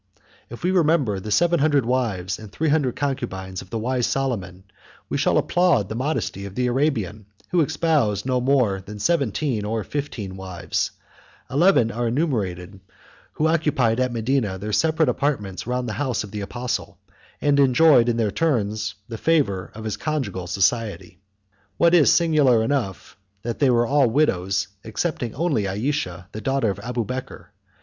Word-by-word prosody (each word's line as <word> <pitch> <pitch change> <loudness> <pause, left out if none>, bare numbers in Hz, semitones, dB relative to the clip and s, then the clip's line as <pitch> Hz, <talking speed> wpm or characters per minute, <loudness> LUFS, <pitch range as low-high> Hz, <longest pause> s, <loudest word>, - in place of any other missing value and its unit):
If 120 - -10
we 180 - +2
remember 155 - +2
the 105 - -7
seven 170 +9 +3
hundred 145 -3 +3
wives 105 -8 -1
and 110 -3 -11
three 160 +6 -1
hundred 145 -5 +1
concubines 95 -10 -3
of 95 - -14
the 115 - -3
wise 125 +2 0
Solomon, 95 -9 -2 0.5
we - - -1
shall - - +2
applaud 170 - +2
the 110 - -4
modesty 130 -6 -2
of 100 -1 -9
the 125 - 0
Arabian, 120 - -1 0.2
who 175 - +3
espoused 145 - +1
no 130 -1 +1
more 125 -7 +2
than 105 +2 -9
seventeen 135 -3 0
or 110 +1 -2
fifteen 115 -10 -5
wives; 95 -2 -3 0.6
eleven 140 -5 +4
are 120 +1 -2
enumerated 105 - -2 0.5
who 155 - -1
occupied 145 -8 +1
at 130 -1 +1
Medina 115 -4 0
their 105 +3 -5
separate 160 +2 +2
apartments 120 -8 -1
round 125 0 -1
the 110 - -3
house 130 -7 -1
of 105 - -10
the 105 - -4
apostle, 120 +5 -4 0.4
and 145 -1 +2
enjoyed 135 -2 +5
in 115 - 0
their 110 -3 +1
turns 110 - -1
the 115 -2 -7
favor 105 - +1
of 110 - -8
his 110 -2 -3
conjugal 110 - -3
society. 95 -1 -1 0.6
What 170 0 +4
is 165 -5 +6
singular 150 -9 +4
enough, 115 -9 -2 0.3
they 120 +4 +1
were 120 -1 +3
all 140 +1 +3
widows, 100 -7 +1 0.2
excepting 120 +1 -3
only 140 - 0
Ayesha, 95 -4 -2
the 110 - -7
daughter 135 -5 +1
of 100 - -7
Abubeker. 120 -4 -5
120 Hz, 160 wpm, -23 LUFS, 100-145 Hz, 0.6 s, is